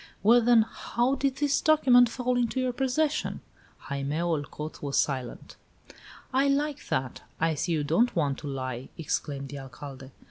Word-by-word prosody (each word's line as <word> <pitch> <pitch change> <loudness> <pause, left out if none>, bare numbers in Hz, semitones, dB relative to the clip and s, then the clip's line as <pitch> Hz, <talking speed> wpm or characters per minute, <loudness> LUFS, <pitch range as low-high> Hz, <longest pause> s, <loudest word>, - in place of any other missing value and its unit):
"Well, 235 +4 +6
then, 235 -1 +5
how 240 +3 -1
did 275 -1 0
this 285 0 +1
document 250 -6 +5
fall 250 +1 -1
into 245 +1 0
your 255 -1 0
possession?" 270 +4 0 0.4
Jaime 140 +2 -3
Olcot 155 -2 -3
was 140 -1 -2
silent. 130 -4 -2 0.8
"I 270 +2 +3
like 290 +1 -1
that! 130 -1 -2 0.2
I 165 0 +2
see 165 +3 -1
you 155 -2 0
don't 170 - +2
want 145 -5 0
to 150 - -7
lie!" 130 -2 -4
exclaimed 140 -3 -3
the 145 - -7
Alcalde. 135 0 -10
170 Hz, 155 wpm, -27 LUFS, -, 0.8 s, Well